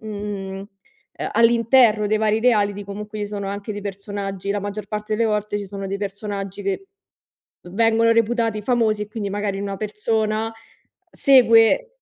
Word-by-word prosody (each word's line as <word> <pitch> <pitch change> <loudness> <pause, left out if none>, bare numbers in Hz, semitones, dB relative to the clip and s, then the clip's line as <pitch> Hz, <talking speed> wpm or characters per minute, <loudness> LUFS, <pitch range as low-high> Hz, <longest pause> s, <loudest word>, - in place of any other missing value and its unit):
mhmm, 205 -2 -5
uhm, 195 +1 -9 0.7
all'interno 230 -1 +4
dei 215 - +2
vari 215 0 +1
reality, 205 -4 +2
comunque 210 +2 -7
ci 205 - -2
sono 205 -1 -5
anche 200 +2 -5
dei 205 - -6
personaggi 200 -1 -5
la 205 - 0
maggior 205 +1 -5
parte 210 +1 -3
delle 230 +1 +1
volte 210 0 -1
ci 200 - -6
sono 195 0 -6
dei 195 +1 -3
personaggi 200 -1 -5
che 200 - -3 0.8
vengono 225 +2 +3
reputati 230 -1 +1
famosi 220 -2 +1
e 210 - -7
quindi 210 -2 -4
magari 200 -1 -2
una 200 -1 -4
persona 215 +1 -1 0.6
segue 255 - +5
210 Hz, 155 wpm, -22 LUFS, 200-225 Hz, 0.8 s, segue